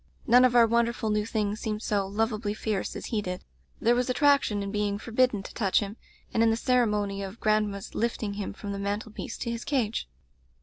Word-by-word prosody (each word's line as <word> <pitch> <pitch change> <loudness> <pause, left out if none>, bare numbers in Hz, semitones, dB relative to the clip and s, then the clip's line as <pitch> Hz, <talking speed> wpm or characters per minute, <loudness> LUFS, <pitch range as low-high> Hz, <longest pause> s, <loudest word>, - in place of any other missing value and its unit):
None 245 +1 +6
of 245 -1 +2
our 235 -1 +8
wonderful 235 -1 +1
new 210 0 0
things 215 -2 -1
seemed 215 0 -3
so 200 -2 0
lovably 215 0 -1
fierce 215 -2 -2
as - - -6
he 215 - +2
did; 180 -2 -5 0.4
there 235 - +4
was 250 +1 0
attraction 265 -6 +3
in 200 - -4
being 205 -1 0
forbidden 230 -1 +1
to - - -9
touch 195 -5 +2
him, 205 0 -4 0.4
and 225 - +2
in 230 - +5
the 225 - +3
ceremony 210 -5 +1
of 195 +3 -7
grand 215 -1 +2
ma's 200 -1 -7
lifting 225 -2 -1
him 200 -1 -4
from 205 - -7
the 200 - -4
mantel 205 +2 -3
piece - - -6
to 235 - -3
his 235 0 -4
cage. 235 - -1
215 Hz, 215 wpm, -28 LUFS, 205-235 Hz, 0.4 s, our